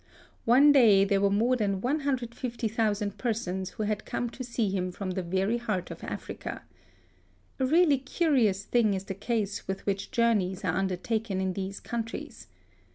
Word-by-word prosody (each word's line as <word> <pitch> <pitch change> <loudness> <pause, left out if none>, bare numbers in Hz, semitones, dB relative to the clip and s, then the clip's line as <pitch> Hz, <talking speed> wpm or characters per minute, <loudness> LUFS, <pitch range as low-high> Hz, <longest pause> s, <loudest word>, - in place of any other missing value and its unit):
One 265 +5 +7
day 220 -8 +6
there 195 0 +2
were 200 - +4
more 225 +6 +2
than 200 -5 0
150,000 235 -6 -1
persons 190 -6 -2
who 215 - -5
had 210 0 -1
come 240 -1 -3
to 255 - -7
see 235 -4 -1
him 185 -1 -1
from 185 +1 -4
the 185 - -2
very 190 +6 0
heart 210 -6 -3
of - - -9
Africa. - - -6 1.0
A 260 - +2
really 310 -2 +4
curious 260 - +1
thing 220 -2 +2
is 190 - -4
the 195 +5 -6
ease 210 -3 -1
with 190 0 -4
which 195 -1 -2
journeys 205 -5 +1
are 160 - +1
under 190 -1 0
taken 220 -1 -2
in 190 -1 -1
these 195 +1 -4
countries. 235 - -6
215 Hz, 165 wpm, -28 LUFS, 195-240 Hz, 1.0 s, One